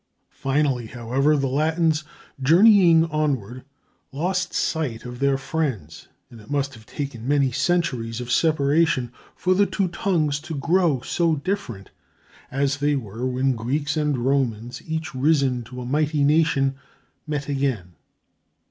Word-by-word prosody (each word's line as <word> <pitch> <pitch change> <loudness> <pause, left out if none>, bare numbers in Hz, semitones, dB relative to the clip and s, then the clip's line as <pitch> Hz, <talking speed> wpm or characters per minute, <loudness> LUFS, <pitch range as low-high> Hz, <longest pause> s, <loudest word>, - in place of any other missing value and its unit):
Finally, 135 -4 0
however, 130 +6 +1
the 140 - 0
Latins, 155 +3 +1 0.4
journeying 170 +1 +6
onward, 130 -6 -2 0.5
lost 180 +7 -1
sight 130 -8 -2
of 125 0 -8
their 140 -1 +2
friends, 135 - -4 0.2
and 115 -2 -12
it 105 - -17
must 140 -1 -1
have 110 -2 -15
taken 130 -5 -6
many 140 -2 +2
centuries 130 -5 -1
of 125 0 -5
separation 145 -4 +2 0.2
for 185 - +1
the 200 +2 +3
two 195 -2 0
tongues 160 -5 0
to 160 +1 -7
grow 165 -2 +1
so 165 +3 +1
different 145 - -4 0.6
as 140 +1 0
they 145 +1 +1
were 115 -1 -4
when 130 +1 +1
Greeks 145 +6 -2
and 150 -3 0
Romans, 120 -3 -1
each 160 0 -4
risen 135 -2 +1
to 125 +2 -9
a - - -6
mighty 150 +2 +1
nation, 145 -2 +3 0.5
met 145 -2 -3
again. 135 -11 -2
140 Hz, 140 wpm, -23 LUFS, 125-155 Hz, 0.6 s, journeying